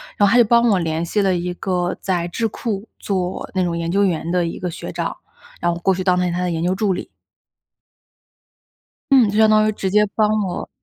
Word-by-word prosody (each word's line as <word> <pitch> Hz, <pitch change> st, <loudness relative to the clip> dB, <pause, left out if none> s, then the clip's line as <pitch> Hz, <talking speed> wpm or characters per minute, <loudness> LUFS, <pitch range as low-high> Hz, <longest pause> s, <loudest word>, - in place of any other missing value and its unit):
然 205 Hz, -, +3 dB
后 -, -, +2 dB
她 240 Hz, -, +5 dB
就 240 Hz, -, +6 dB
帮 235 Hz, +2 st, +4 dB
我 195 Hz, -4 st, +3 dB
联 160 Hz, 0 st, -2 dB
系 205 Hz, +4 st, 0 dB
了 190 Hz, -2 st, +2 dB
一 175 Hz, 0 st, -3 dB
个 180 Hz, -1 st, -2 dB
在 180 Hz, -3 st, -1 dB
智 225 Hz, +5 st, -1 dB
库 215 Hz, -1 st, -4 dB
做 185 Hz, -2 st, -3 dB
那 185 Hz, -, +1 dB
种 170 Hz, -1 st, -2 dB
研 170 Hz, 0 st, -2 dB
究 200 Hz, +2 st, +3 dB
员 170 Hz, -2 st, -1 dB
的 180 Hz, -1 st, +1 dB
一 165 Hz, -, -5 dB
个 180 Hz, -1 st, -3 dB
学 -, -, -7 dB
长， -, -, -3 dB, 0.4 s
然 175 Hz, -, 0 dB
后 170 Hz, -, 0 dB
我 170 Hz, -, -9 dB
过 190 Hz, -, +3 dB
去 185 Hz, +1 st, -4 dB
当 180 Hz, -1 st, +3 dB
了 180 Hz, -1 st, 0 dB
他 175 Hz, -, -2 dB
的 180 Hz, -1 st, -1 dB
研 165 Hz, 0 st, -2 dB
究 180 Hz, +2 st, +1 dB
助 195 Hz, -1 st, 0 dB
理。 180 Hz, -, -6 dB, 2.0 s
嗯， 255 Hz, -5 st, +6 dB
就 210 Hz, -, -2 dB
相 220 Hz, 0 st, +5 dB
当 215 Hz, 0 st, +4 dB
于 -, -, +2 dB
直 195 Hz, -2 st, -3 dB
接 210 Hz, +2 st, +4 dB
帮 215 Hz, -1 st, +3 dB, 0.2 s
我。 175 Hz, -, -5 dB
185 Hz, 260 characters per minute, -20 LUFS, 175-210 Hz, 2.0 s, 就